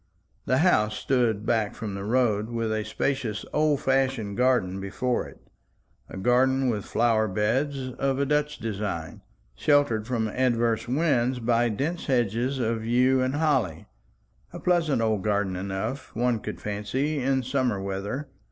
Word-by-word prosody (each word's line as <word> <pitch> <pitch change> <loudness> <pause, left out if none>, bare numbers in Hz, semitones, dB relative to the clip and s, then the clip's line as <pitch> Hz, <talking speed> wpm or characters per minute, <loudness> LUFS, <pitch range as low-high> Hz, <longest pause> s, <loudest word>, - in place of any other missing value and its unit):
The 130 - +3
house 105 -12 +3
stood 115 -5 +1
back 110 -3 0
from 110 -3 -5
the 100 0 -5
road, 110 -1 +1
with 115 -2 -1
a 110 0 -1
spacious 120 -4 -2
old 150 -2 +2
fashioned 130 -6 0
garden 120 -7 +2
before 120 +6 -1
it; - - -15 0.7
a - - -8
garden 130 +5 +3
with 105 -4 -2
flower 115 -2 +2
beds 130 +7 -1
of 135 -1 +1
a 140 - +1
Dutch 150 +1 0
design, 100 -7 -4 0.3
sheltered 145 -7 +2
from 115 -3 0
adverse 120 -1 +1
winds 130 -3 +1
by 120 0 +2
dense 150 +11 -3
hedges 120 +1 +1
of 115 -2 -1
yew 125 +3 +3
and 130 +2 0
holly; 130 - 0 0.7
a - - -8
pleasant 165 -9 +1
old 110 -3 +1
garden 100 -3 0
enough, 95 +8 -4
one 120 0 +1
could - - -6
fancy, 115 +9 -2
in 135 0 +1
summer 130 -5 0
weather. 100 +8 -4
120 Hz, 150 wpm, -26 LUFS, 105-135 Hz, 0.7 s, The